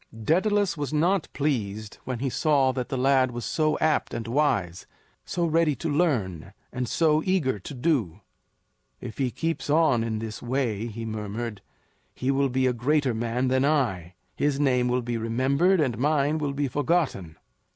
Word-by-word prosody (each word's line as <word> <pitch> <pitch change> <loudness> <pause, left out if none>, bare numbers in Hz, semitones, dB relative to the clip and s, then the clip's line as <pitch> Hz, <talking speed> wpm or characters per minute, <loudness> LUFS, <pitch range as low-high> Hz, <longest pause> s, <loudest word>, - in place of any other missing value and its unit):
Daedalus 185 - +1
was 145 -4 -4
not 170 +4 +1
pleased 110 -8 -2
when 130 -1 -3
he 135 +3 -2
saw 140 -3 +2
that 125 -1 -4
the 135 - -2
lad 130 0 +3
was 120 -1 -5
so 155 -1 +1
apt 155 -1 0
and 115 - -4
wise, 110 - 0 0.4
so 175 -1 -1
ready 165 -2 +2
to 155 +5 -3
learn, 120 - 0 0.2
and 125 -1 -3
so 155 -2 +3
eager 155 - 0
to 120 - -8
do. 120 - 0 0.8
"If 110 - -8
he 130 -2 +1
keeps 165 +4 -3
on 145 -6 +3
in 110 -1 -2
this 110 0 -6
way," 120 -4 -1
he 115 0 -6
murmured, 110 0 -5 0.5
"he 130 +2 0
will 140 0 +1
be 130 +1 +1
a 125 - +2
greater 135 +2 +1
man 120 +3 -1
than 130 +1 +2
I; 110 - 0 0.2
his 145 -1 0
name 125 -4 +2
will 125 0 0
be 120 0 -2
remembered, 135 +11 +2
and 130 -7 +1
mine 150 +2 +1
will 145 -2 -2
be 145 0 -1
forgotten." 140 - -1
130 Hz, 170 wpm, -26 LUFS, 115-150 Hz, 0.8 s, lad